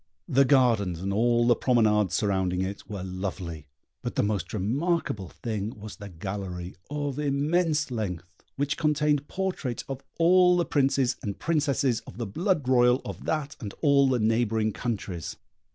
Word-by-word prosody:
The 140 -4 +4
gardens 115 - +3
and 100 +1 -2
all 120 +2 +3
the 120 0 +5
promenades 105 -6 +2
surrounding 95 -3 +1
it 100 +1 -6
were 100 -3 -5
lovely, 90 -4 -5 0.3
but - - -4
the - - +2
most 100 -4 -1
remarkable 110 - -1
thing 110 -2 -4
was 105 +1 -8
the 100 -1 -8
gallery, 90 0 -5 0.2
of 145 -1 -3
immense 150 +1 +1
length, 95 -7 -3 0.3
which 145 +2 -1
contained 150 -2 +1
portraits 185 -10 -3
of 135 -1 -5 0.2
all 180 +1 +5
the 175 - +2
princes 135 -3 +2
and 100 -1 -4
princesses 140 -6 +1
of - - -10
the 120 - -3
blood 160 - 0
royal 125 0 +4
of - - -7
that 150 -2 -2
and 105 -5 -7
all 140 -2 +5
the 130 - +2
neighbouring 110 -1 +1
countries. 100 -8 -4
120 Hz, 155 wpm, -27 LUFS, 100-145 Hz, 0.3 s, the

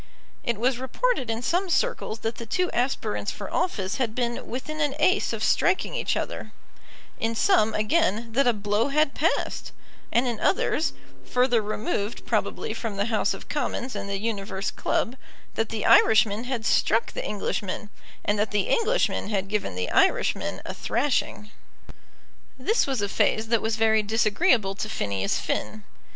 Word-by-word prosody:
It 235 -2 -1
was 245 +2 +1
reported 260 - 0
in 225 +1 -2
some 360 +7 0
circles 345 - 0
that 225 +1 -2
the 230 - -7
two 360 +10 0
aspirants 105 - -1
for 200 - -6
office 200 - -1
had 230 -4 -1
been 240 -1 -2
within 310 +5 -4
an 290 -2 +1
ace 370 +6 +3
of - - -3
striking 375 - +2
each - - 0
other; - - -5 0.7
in 225 0 -1
some, 225 - +3
again, 225 - +1
that 275 +2 +3
a - - +6
blow 210 +3 0
had 290 0 +2
passed, 330 +3 -1 0.4
and 240 +2 +3
in 235 -3 -2
others, 325 -4 +1 0.3
further 250 -2 +2
removed 210 0 -3
probably - - -1
from 220 -4 -4
the 200 - +1
House 210 -1 +1
of - - -12
Commons 260 -2 -3
and 200 - -4
the 200 - -1
Universe 200 -2 -3
Club, 240 - -1 0.4
that 225 -1 -1
the 220 -2 -3
Irishman 220 -1 +5
had 245 -3 -3
struck 225 +1 +2
the - - -4
Englishman, 205 0 -3 0.3
and 205 0 +1
that 210 - +1
the 210 -1 +1
Englishman 460 - +1
had 195 -2 -1
given 210 - -2
the 90 0 -2
Irishman - - +2
a - - -4
thrashing. 230 -4 -1 1.1
This 410 - +1
was 260 -6 -1
a - - +1
phase 220 +2 +1
that 230 -2 +3
was 220 0 0
very 220 -1 +3
disagreeable 215 - +2
to 215 +2 -4
Phineas 100 - -1
Finn. 215 -1 -3
225 Hz, 165 wpm, -25 LUFS, 210-260 Hz, 1.1 s, a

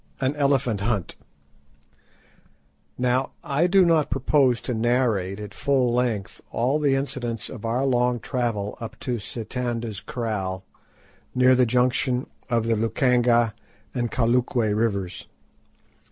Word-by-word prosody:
AN 135 +1 0
ELEPHANT 135 -7 +1
HUNT 100 -4 -1 1.8
Now 125 +1 0
I 150 +5 +1
do 190 0 +5
not 165 -3 +3
propose 130 -6 +2
to 125 - -3
narrate 110 -5 +1
at 105 -1 -7
full 130 -4 +1
length 115 -7 -1
all 130 +6 +1
the 140 -3 +2
incidents 130 -5 -3
of 115 -3 -8
our 120 +4 0
long 125 -2 +2
travel 115 -5 -2
up 115 - -7
to 125 -3 -2
Sitanda's 115 0 -4
Kraal, 95 -6 -3 0.7
near 130 0 +5
the 125 -1 +4
junction 125 +1 +1 0.2
of 115 -2 +1
the 115 0 +2
Lukanga 120 0 +2 0.4
and 120 -1 -1
Kalukwe 120 -2 +1
Rivers. 100 -5 -2
120 Hz, 125 wpm, -24 LUFS, 115-130 Hz, 1.8 s, do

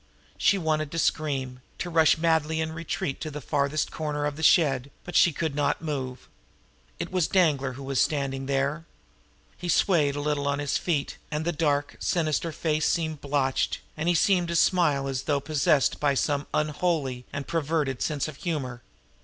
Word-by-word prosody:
She 200 - +4
wanted 155 -4 -1
to - - -3
scream, 135 -6 -1 0.2
to 175 - -4
rush 160 -1 +5
madly 160 -1 +1
in 160 0 -1
retreat 160 -4 -3
to 155 - -3
the 150 0 -6
farthest 145 +2 -1
corner 150 -2 -2
of 145 -1 -2
the 160 - -7
shed; 140 -5 +4
but 180 - -8
she 175 - +6
could 160 0 -2
not 145 0 0
move. 130 -5 -4 0.7
It - - -5
was 185 -4 +1
Danglar 145 -8 +2
who 135 +2 -9
was 135 -1 0
standing 135 -2 -1
there. 140 +4 0 0.7
He 175 - -4
seemed - - +4
to - - +5
sway 165 -8 +3
a - - -3
little 145 -1 -1
on 140 0 +1
his 145 -1 -1
feet, 155 -6 -1
and 155 +1 -2
the 175 - +1
dark, 145 -3 0
sinister 165 -1 0
face 155 0 0
seemed 160 -3 -1
blotched, 140 -2 0 0.2
and 160 +3 -1
he 175 - +3
seemed 180 +1 +3
to 170 - -2
smile 150 -6 +3
as 135 -1 -2
though 145 -2 +1
possessed 150 0 +2
of 140 -2 +2
some 145 0 0
unholy 150 -5 -1
and 140 -1 -4
perverted 150 -4 -1
sense 150 -2 -1
of 155 - -8
humor. 135 -9 -3
150 Hz, 185 wpm, -26 LUFS, 140-160 Hz, 0.7 s, she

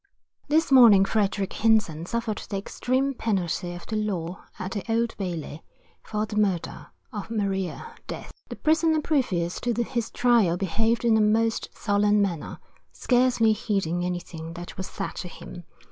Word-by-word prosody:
This 310 0 +2
morning 230 -7 +8
Frederick 200 -1 0
Hinson 210 -8 +2
suffered 230 -1 -2
the 200 - -2
extreme 260 +7 -1
penalty 180 -6 -2
of 175 - -10
the 220 - -4
law 185 -4 -3
at 190 -1 -5
the 200 -1 -3
Old 230 0 +1
Bailey, 165 -5 -4 0.4
for 210 0 -2
the 210 -1 -6
murder 195 -5 -1 0.3
of 210 0 -5
Maria 200 - -2
Death. - - -7 0.2
The - - -5
prisoner 315 0 +2
previous 195 - 0
to 245 -1 0
his 235 -2 -3
trial 230 -8 +3
behaved 225 +6 0
in 225 -2 +5
a - - +3
most 225 +2 +1
sullen 205 0 +2
manner, 180 -6 -2 0.3
scarcely 245 -3 +3
heeding 195 -6 -1
anything 175 -2 -5
that 175 +1 -8
was 190 - -5
said - - -5
to 180 - -4
him. 175 0 -10
210 Hz, 155 wpm, -26 LUFS, 180-230 Hz, 0.4 s, morning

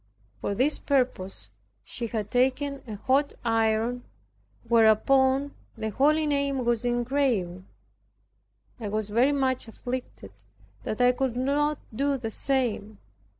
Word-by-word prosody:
For 200 - -2
this 270 +7 +3
purpose 195 - -1 0.3
she 235 - -4
had 215 -2 -4
taken 265 +3 +1
a 215 - -5
hot 270 +7 +1
iron, 225 +2 +1 0.6
whereupon 265 +5 +3 0.2
the 220 0 -3
holy 305 +7 +3
name 280 -3 0
was 235 -1 +1
engraven. 240 -7 0 1.1
I 215 -3 -4
was 215 0 -2
very 245 +6 +3
much 260 -3 0
afflicted 245 - -6 0.5
that 215 - -2
I 245 0 +6
could 250 -1 -2
not 290 +3 +1 0.2
do 280 +3 +1
the 225 -3 -5
same. 225 -6 -1
245 Hz, 120 wpm, -26 LUFS, 220-275 Hz, 1.1 s, I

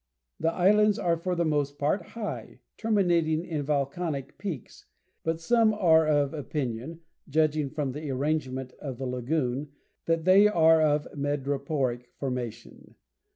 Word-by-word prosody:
The 165 - +1
islands 210 +4 +4
are 170 -1 +1
for 180 +2 -2
the 170 0 +1
most 145 -2 0
part 150 +7 +1
high, 215 +5 -7
terminating 175 -7 +1
in 155 -4 -3
volcanic 140 0 -2
peaks; 175 - -7 0.4
but 165 0 -1
some 220 +4 +3
are 160 -6 +4
of 145 -2 +2
opinion, 145 0 -4 0.3
judging 155 -1 +1
from 140 -1 -2
the 150 +2 -6
arrangement 130 -2 -2
of 135 -4 -6
the 135 - -4
lagoon, 130 +2 -2 0.3
that 165 0 +1
they 195 +3 +7
are 165 -5 +5
of 150 -1 +2
madreporic 140 -3 -2
formation. 125 -4 -6
155 Hz, 135 wpm, -27 LUFS, 140-170 Hz, 0.4 s, they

